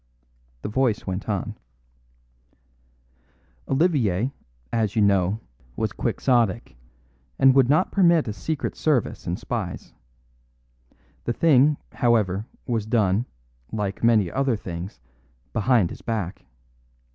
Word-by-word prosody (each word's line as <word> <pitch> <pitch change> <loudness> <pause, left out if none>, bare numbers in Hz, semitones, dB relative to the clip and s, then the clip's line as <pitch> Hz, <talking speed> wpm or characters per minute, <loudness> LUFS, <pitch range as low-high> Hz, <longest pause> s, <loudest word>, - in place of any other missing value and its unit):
The - - -2
voice 115 0 0
went 95 +3 -4
on: 100 -3 -3 2.1
"Olivier, 135 - +2 0.4
as 110 -2 0
you 110 - +4
know, 100 +1 +2 0.3
was - - -1
quixotic, 115 - 0 0.6
and 135 0 +6
would 130 -2 +4
not 155 +6 +3
permit 170 -7 +4
a 105 - -2
secret 145 +8 -3
service 145 -8 0
and - - -1
spies. - - -5 1.3
The 120 - 0
thing, 145 0 +4
however, 110 -4 +1 0.2
was 115 -4 -1
done, 110 0 +2 0.4
like 105 -2 -3
many 110 -6 +4
other 135 -3 +1
things, 90 -1 -7 0.5
behind 110 -5 +2
his - - -9
back. 105 -7 -4
115 Hz, 110 wpm, -24 LUFS, 100-130 Hz, 2.1 s, and